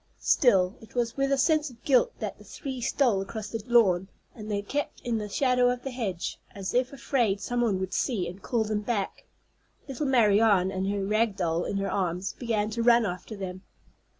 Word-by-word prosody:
Still, 190 -7 +3
it 225 - -16
was 240 -1 0
with 275 0 0
a 275 - +3
sense 310 +2 +2
of 235 -2 -18
guilt 280 - +4
that - - -5
the - - -13
three 265 -3 -6
stole 235 -5 +2
across 210 +2 -6
the 225 - -4
lawn; 195 -7 +4 0.3
and 215 -2 -9
they 205 -1 -1
kept 290 +8 -3
in 235 -2 -1
the 210 -1 -5
shadow 250 +1 +3
of 245 0 -2
the 270 - -4
hedge, 205 -9 -3 0.2
as 195 -1 -4
if 250 +1 +1
afraid 240 -7 0
some 245 +3 -2
one 210 -6 +1
would 190 0 -4
see 205 -9 0
and 180 +3 -9
call 235 -4 0
them 215 -1 -2
back. 205 -2 -3 0.6
Little 275 +1 -3
Marianne, 210 -6 +4
with 190 0 -2
her 200 -1 -1
rag 215 +1 +1
doll 170 -3 -1
in 200 - -2
her 195 0 -1
arms, 185 -1 -1
began 220 -3 -1
to 230 +2 -2
run 235 0 +5
after 185 +3 -5
them. 185 -2 -6
220 Hz, 205 wpm, -27 LUFS, 195-245 Hz, 0.6 s, run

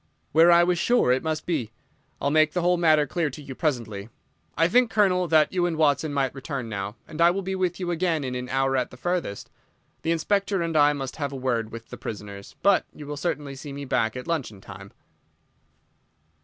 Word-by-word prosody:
"Where 165 +3 +6
I 170 0 +7
was 175 -1 +1
sure 240 - +3
it 130 +1 +2
must 155 -1 -3
be. 140 -11 -2 0.5
I'll 140 - 0
make 155 0 +4
the 180 - 0
whole 180 +1 +4
matter 155 -3 +4
clear 160 +2 -1
to 140 - -10
you 140 -2 -8
presently. 115 -8 -2 0.5
I 165 +2 +4
think, 245 +6 +3
Colonel, 185 -5 +2
that 155 +1 +3
you 175 -1 +2
and 165 -2 -3
Watson 150 0 +2
might 140 -2 0
return 135 -2 -5
now, 100 -1 -4
and 160 0 -5
I 170 - +7
will 195 +3 -1
be 190 +1 -3
with 185 -2 -1
you 180 -2 -2
again 170 -3 0
in 130 -1 -3
an 125 0 -5
hour 135 0 +1
at 125 -1 0
the 125 - -13
furthest. 175 - -3 0.5
The - - -3
Inspector 195 +4 0
and 165 -1 -2
I 145 -1 +5
must 135 -3 -5
have 145 -3 -2
a - - -6
word 120 -4 -1
with 115 0 -9
the - - -7
prisoners, 100 -2 -8
but 200 -1 +4
you 150 - -9
will 145 +1 -5
certainly 145 -3 -3
see 140 +2 -8
me 140 0 -6
back 110 -3 0
at 125 - -6
luncheon 140 - -3
time." 95 +1 -11
150 Hz, 220 wpm, -25 LUFS, 130-175 Hz, 0.5 s, I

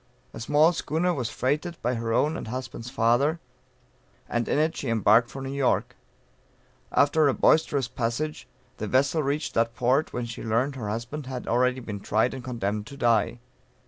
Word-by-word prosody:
A - - -8
small 150 +8 +4
schooner 165 +2 0
was 125 -7 -2
freighted 150 +6 -2
by 125 +2 +1
her 115 -1 -2
own 150 +7 +2
and - - -6
husband's 120 0 -6
father, 135 +6 +2 0.9
and 120 0 -1
in - - +1
it 155 +2 +1
she 135 - -4
embarked 115 +1 +4
for 135 - -7
New 135 0 -4
York. 140 -2 0 1.0
After 145 +2 +4
a 135 - +2
boisterous 145 -5 +3
passage, 120 +7 -3 0.3
the 110 - -4
vessel 135 +7 +2
reached 145 +2 -2
that 115 0 +1
port, 130 +5 +1
when 120 -1 -3
she 115 -1 -7
learned 120 +5 0
her 110 -6 -4
husband 120 +6 -5
had 130 -2 -5
already 125 +2 +2
been 105 -4 -6
tried 110 +5 +1
and 130 -2 -7
condemned 110 -4 -3
to 140 - -10
die. 120 -3 +2
125 Hz, 175 wpm, -26 LUFS, 115-145 Hz, 1.0 s, small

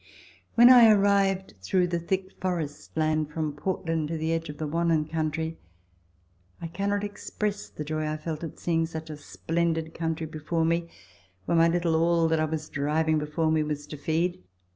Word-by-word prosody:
When 240 +2 +9
I 240 -3 +9
arrived 200 -2 +3
through 180 - +1
the 170 -1 0
thick 185 +2 -2
forest 165 -5 -3
land 155 -1 +1
from 155 -1 -3
Portland 165 -1 -2
to 165 +1 -3
the 160 +1 -1
edge 165 -1 -2
of 145 - -7
the 155 - -3
Wannon 165 0 +1
country, 160 0 -2 1.0
I - - -6
cannot 200 +4 -1
express 205 0 -4
the 150 - -6
joy 155 +1 -2
I 155 0 -2
felt 155 +1 -5
at 160 - -6
seeing 165 -1 0
such 160 -1 -7
a 150 - -7
splendid 165 +2 -2
country 165 -1 -2
before 160 +1 -2
me 170 +1 0 0.6
where - - +1
my 165 0 +6
little 170 -1 +1
all 165 0 +3
that 160 0 +2
I 155 - +2
was 155 0 -4
driving 155 +2 +1
before 150 +2 0
me 160 -1 +2
was 150 -1 -3
to 150 - -8
feed. 165 - -1
165 Hz, 185 wpm, -27 LUFS, 155-170 Hz, 1.0 s, When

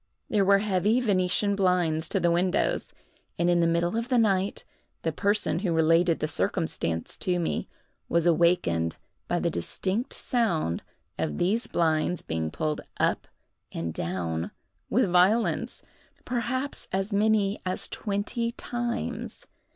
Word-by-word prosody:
There 210 -2 +3
were 200 +1 +5
heavy 205 +3 +2
Venetian 200 -2 +2
blinds 175 -4 +2
to 195 - +1
the 170 -1 +2
windows; 180 +2 +1 0.5
and, 175 0 +2
in 175 - +3
the 170 - +3
middle 170 +3 +1
of 230 +2 -2
the 255 - +3
night, 200 -3 +1 0.4
the 160 - 0
person 200 +2 +1
who 185 -2 -1
related 165 +1 +4
the 155 - -1
circumstance 80 - -1
to 180 -1 0
me, 170 - -2 0.4
was 170 0 +2
awakened 165 - +2 0.3
by - - 0
the - - 0
distinct 190 - -2
sound 170 - 0 0.4
of 80 -2 -1
these 215 +7 +1
blinds 160 +1 +1
being 80 -1 -2
pulled 155 - -2 0.2
up - - +1 0.4
and 80 -1 -4
down 85 -1 -2 0.4
with 245 0 +3
violence, 185 +6 +2 0.4
perhaps 255 +3 -2
as 195 +2 -1
many 210 -1 +2
as 185 +2 0
twenty 220 +3 -2
times. 240 - -4
180 Hz, 135 wpm, -27 LUFS, 160-210 Hz, 0.5 s, were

